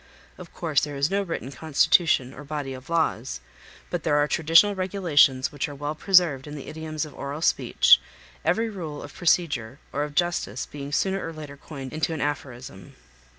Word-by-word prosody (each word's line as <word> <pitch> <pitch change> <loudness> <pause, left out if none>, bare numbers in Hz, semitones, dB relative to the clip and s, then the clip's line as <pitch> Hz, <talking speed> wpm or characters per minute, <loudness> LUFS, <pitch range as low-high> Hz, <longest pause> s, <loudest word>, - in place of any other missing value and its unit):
Of 180 -2 -11
course 155 -5 0
there 145 -1 -4
is 140 +4 0
no 200 +1 +1
written 165 -8 -5
constitution 145 -1 +2
or 150 - -10
body 145 -2 -4
of 130 +2 -11
laws, 160 - -1 0.5
but - - -2
there 145 - +1
are 145 0 +3
traditional 165 +7 +4
regulations 170 -8 +2
which 145 -1 -3
are 145 - -8
well 145 +2 -3
preserved 155 -5 +3
in 150 - -7
the 140 - -8
idioms 155 -1 -4
of 150 - -12
oral 145 +3 -5
speech, - - +5 0.4
every 225 +1 +1
rule 165 -9 -6
of 145 - -10
procedure 145 -9 0 0.2
or 145 - -1
of 150 -1 -6
justice 170 - -1
being 140 -1 -8
sooner 190 +5 0
or 165 - -4
later 150 -3 -9
coined 135 -2 -9
into 160 +1 -1
an - - -5
aphorism. 130 -8 -5
150 Hz, 185 wpm, -25 LUFS, 140-165 Hz, 0.5 s, speech